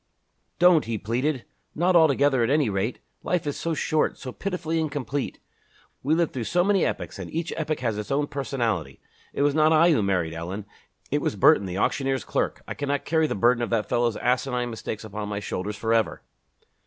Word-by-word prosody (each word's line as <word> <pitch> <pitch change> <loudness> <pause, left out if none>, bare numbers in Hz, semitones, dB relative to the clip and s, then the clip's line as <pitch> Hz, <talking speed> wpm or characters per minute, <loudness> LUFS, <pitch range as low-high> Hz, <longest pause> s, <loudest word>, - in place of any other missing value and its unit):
"Don't!" 175 -2 +5
he 115 -1 -2
pleaded, 125 +6 -1 0.3
"not 180 +3 +2
altogether, 140 -5 +4
at 115 - +1
any 140 -6 +2
rate. 100 +5 -1 0.2
Life 180 -3 -1
is 145 - -2
so 165 -1 -2
short, 155 0 0
so 130 - -7
pitifully 165 -1 -2
incomplete. 145 -3 -3 0.6
We 150 +4 +2
live 170 -1 +1
through 120 -3 -4
so 175 +7 +2
many 195 -1 +3
epochs - - -3
and - - -6
each 165 +1 -3
epoch 155 -3 -2
has 115 -4 -1
its 105 - -6
own 145 +1 +1
personality. 115 - -2 0.3
It - - -1
was 145 0 +3
not 155 +1 +4
I 165 +2 +6
who 145 - +3
married 90 -5 0
Ellen. 90 +5 -5 0.5
It - - +1
was - - -1
Burton, 100 - +5
the 90 0 -4
auctioneer's 135 +4 0
clerk. - - -2
I - - -3
cannot 145 -1 -2
carry 160 0 +2
the - - -2
burden 120 +4 +3
of 120 - -1
that 115 -2 0
fellow's 120 -2 +1
asinine 125 0 0
mistakes 110 -1 -5
upon 105 -1 -5
my 100 -1 -2
shoulders 105 0 -4
forever." 115 +2 0
130 Hz, 195 wpm, -25 LUFS, 110-155 Hz, 0.6 s, I